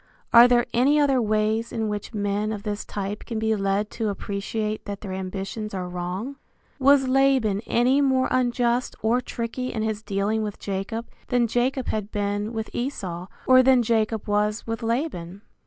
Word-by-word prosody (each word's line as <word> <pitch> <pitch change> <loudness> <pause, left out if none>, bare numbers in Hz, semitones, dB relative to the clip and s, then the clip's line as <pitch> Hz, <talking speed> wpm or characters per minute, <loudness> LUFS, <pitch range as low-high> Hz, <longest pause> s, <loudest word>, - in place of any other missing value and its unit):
Are 235 +1 +10
there 240 -1 +3
any 275 +5 +4
other 275 -3 +3
ways 215 +1 0
in 220 -1 -2
which 210 -1 -4
men 205 0 -1
of 210 -2 -5
this 210 -1 -3
type 205 +1 -4
can 230 - -5
be 220 0 +1
led 200 +1 0
to 225 -2 -2
appreciate 210 +2 -3
that 200 -1 -6
their 195 -3 -5
ambitions 195 +3 -5
are 180 -1 -3
wrong? 180 +9 -4 0.4
Was 270 0 +5
Laban 260 -6 +3
any 255 +4 +3
more 265 -2 +2
unjust 245 -1 +1
or 235 +3 +2
tricky 250 +1 -4
in 220 - -2
his 220 -1 -2
dealing 205 +1 -1
with 210 -2 -4
Jacob 205 +4 -4 0.2
than 245 -2 +2
Jacob 245 +3 0
had 210 -1 -2
been 205 +1 -2
with 220 -1 -5
Esau, 185 -9 -4 0.2
or 255 0 +7
than 255 -1 +5
Jacob 220 -1 0
was 210 +1 0
with 225 +1 -4
Laban? 225 - -3
220 Hz, 170 wpm, -24 LUFS, 205-245 Hz, 0.4 s, Are